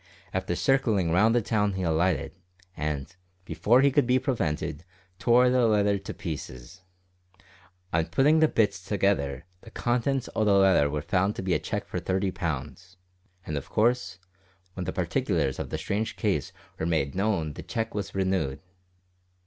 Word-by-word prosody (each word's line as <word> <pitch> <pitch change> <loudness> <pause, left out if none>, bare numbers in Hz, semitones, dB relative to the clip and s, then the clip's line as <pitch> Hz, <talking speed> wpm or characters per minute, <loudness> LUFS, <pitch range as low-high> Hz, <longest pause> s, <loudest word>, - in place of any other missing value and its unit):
After 95 -1 -1
circlin' 110 -9 +2
round 110 +7 +4
the 120 - +2
town 105 -2 +1
he 95 -1 -3
alighted, 85 -2 +1 0.4
and, 75 +2 -4 0.3
before 120 +6 +3
he 140 0 +4
could 140 -2 +2
be 125 0 +4
prevented, 85 - -2 0.4
tore 125 +1 +4
the 125 -2 +3
letter 105 -2 +2
to - - -7
pieces. 80 -1 -7 1.1
On 80 0 +1
puttin' 145 - +3
the 155 - +5
bits 100 -9 0
together 90 -8 0 0.2
the 115 - -13
contents 125 +3 -1
o' 110 - +2
the 105 -2 +4
letter 95 -7 +4
was 75 0 -3
found 95 +3 +1
to - - -5
be 95 -1 0
a - - +2
cheque - - -4
for - - -4
thirty 95 0 -1
pounds, 85 +3 -5 0.5
and 75 - -4
of 70 - -5
course, 110 -4 +1 0.6
when 90 -1 -5
the - - -2
particulars 65 -1 -1
o' - - -2
the - - -4
strange 105 +3 -2
case - - -1 0.3
were 80 - -1
made 80 -5 0
known 95 -6 0
the - - -8
cheque 110 +5 -3
was 100 -2 -4
renewed! 95 -8 0
95 Hz, 165 wpm, -27 LUFS, 80-110 Hz, 1.1 s, the